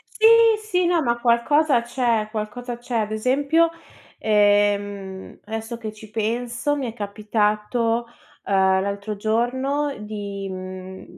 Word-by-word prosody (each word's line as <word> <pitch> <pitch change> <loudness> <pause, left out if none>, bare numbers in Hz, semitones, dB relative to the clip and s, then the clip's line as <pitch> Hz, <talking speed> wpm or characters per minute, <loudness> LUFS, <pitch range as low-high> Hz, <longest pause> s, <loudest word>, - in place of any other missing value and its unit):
Sì, 440 - +4 0.4
sì, 365 -4 0
no, 345 -2 +2
ma 235 -3 0
qualcosa 245 +4 +3
c'è, 235 -3 0
qualcosa 225 +3 -5
c'è. 240 0 -3
Ad 215 -1 -1
esempio, 280 +9 +2 0.5
ehm, 205 -2 +1
adesso 225 +2 -5
che 220 -2 -5
ci 215 0 -13
penso 235 +5 -1
mi 275 -3 -2
è 230 - -4
capitato, 215 +2 0 0.4
ehm, 190 -1 +3
l'altro 200 +1 -4
giorno 260 +7 0
di 200 -2 -5
mhmm, 185 0 -8
220 Hz, 125 wpm, -23 LUFS, 205-245 Hz, 0.5 s, Sì